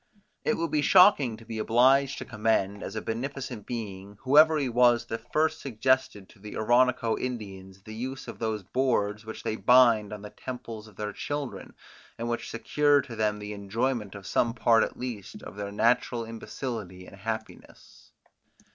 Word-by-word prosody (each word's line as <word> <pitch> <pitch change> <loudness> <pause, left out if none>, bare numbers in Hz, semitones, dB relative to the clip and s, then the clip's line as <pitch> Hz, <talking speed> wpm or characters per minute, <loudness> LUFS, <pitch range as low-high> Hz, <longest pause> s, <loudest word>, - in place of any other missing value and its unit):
It 230 - +1
would 165 -2 -2
be 150 -1 +2
shocking 150 - +5
to 115 - -15
be 110 -1 -5
obliged 130 +5 +3
to - - -6
commend, 105 -3 0
as 100 - -6
a 110 - -4
beneficent 125 -1 -5
being, 100 -4 -6
whoever 155 +4 +6
he 140 -3 0
was 120 0 +4
that 115 0 -7
first 155 +1 +1
suggested 130 -4 0
to 110 - -19
the 105 +1 -8
Oronoco 120 0 +3
Indians 95 -6 -6
the 110 - -9
use 130 +4 -6
of - - -8
those 110 -3 -2
boards 110 -3 0
which 110 - -7
they 110 - -2
bind 120 -5 +5
on 105 -1 -7
the 105 - -9
temples 115 -4 -8
of 105 - -17
their 105 0 -4
children, 145 +1 -5 0.4
and 115 - -4
which 120 0 -3
secure 145 +5 +2
to 120 -4 -9
them 105 -1 0
the 105 0 -6
enjoyment 105 +1 -2
of 100 -1 -10
some 115 +4 +1
part 115 -1 +4
at - - -4
least 120 -6 -7
of - - -9
their 100 -1 -5
natural 120 +2 +1
imbecility 110 -5 -6
and 100 - -13
happiness. 110 +2 -8
115 Hz, 175 wpm, -27 LUFS, 105-130 Hz, 0.4 s, whoever